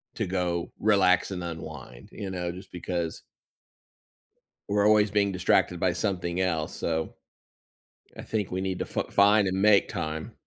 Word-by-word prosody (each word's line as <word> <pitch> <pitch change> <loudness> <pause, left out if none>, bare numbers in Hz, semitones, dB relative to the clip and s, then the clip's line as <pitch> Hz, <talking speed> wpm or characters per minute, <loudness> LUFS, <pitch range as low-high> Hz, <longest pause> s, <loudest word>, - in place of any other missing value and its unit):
to - - -2
go 90 -2 -2
relax 100 -3 +3
and 90 -2 -4
unwind, 75 -7 -8
you 100 - -6
know? 90 -2 -3
Just 90 +2 -11
because 85 -2 -4 1.5
we're 100 0 +2
always 105 -1 +4
being 100 -1 +2
distracted 90 -1 +2
by 90 -1 +1
something 90 -3 -2
else, 80 -4 -1
so, 80 -1 -2 1.0
I - - -8
think 105 -4 -3
we 95 +1 -2
need 95 -1 -2
to - - -2
fi - - -2
find 100 0 +4
and 95 +1 -1
make 105 -1 +5
time. 80 0 -4
90 Hz, 155 wpm, -27 LUFS, 85-100 Hz, 1.5 s, make